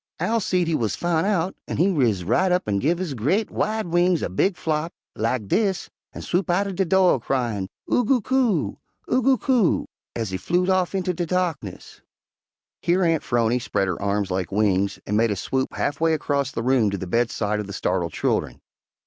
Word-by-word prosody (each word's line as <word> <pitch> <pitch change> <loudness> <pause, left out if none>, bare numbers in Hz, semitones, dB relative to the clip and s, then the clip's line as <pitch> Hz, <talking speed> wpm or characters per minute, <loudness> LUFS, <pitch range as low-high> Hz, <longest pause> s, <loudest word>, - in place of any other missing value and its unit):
"Owl 230 +1 +1
seed 180 -4 0
he 165 - 0
wuz 115 -9 0
foun' 175 0 0
out, 190 -3 0
an' - - -3
he 190 +4 +3
riz 115 - +1
up 180 - +2
an' 100 -1 +1
give 165 - +1
his 175 -5 -3
gre't, 155 - 0
wide 220 0 -1
wings 175 0 +2
a - - -1
big 180 - +1
flop, 160 +1 -1 0.2
lak 115 +2 -1
dis, 195 - 0 0.2
an' - - -8
swoop 180 +2 -1
out 175 +3 +3
de 190 - +1
do' 185 -4 +4
cryin' 115 -6 -1 0.2
'Oo 245 - +2
goo 250 +3 +3
coo! 255 -1 0 0.3
Oo 255 - +3
goo 265 +1 +4
coo!' 240 -9 +2 0.3
ez 110 -4 -3
he 95 - -2
flewed 180 - +1
off 185 0 +1
inter 185 -1 0
de 175 0 -3
darkness." 170 - -3 0.8
Here 180 +2 +2
Aunt 165 -3 +2
'Phrony 120 0 +1
spread 100 -4 -1
her 90 0 -3
arms 100 -1 -1
like 95 +1 -2
wings 100 -1 +1
and 105 - -1
made 115 +1 +3
a 105 - 0
swoop 130 +7 -2
half 145 +1 -2
way 165 -1 +3
across 140 -3 -1
the 115 - -4
room 125 -4 +3
to 100 - -3
the 95 - -5
bedside 105 0 0
of 105 - -4
the - - -7
startled 85 -3 -1
children. - - -1
155 Hz, 200 wpm, -23 LUFS, -, 0.8 s, do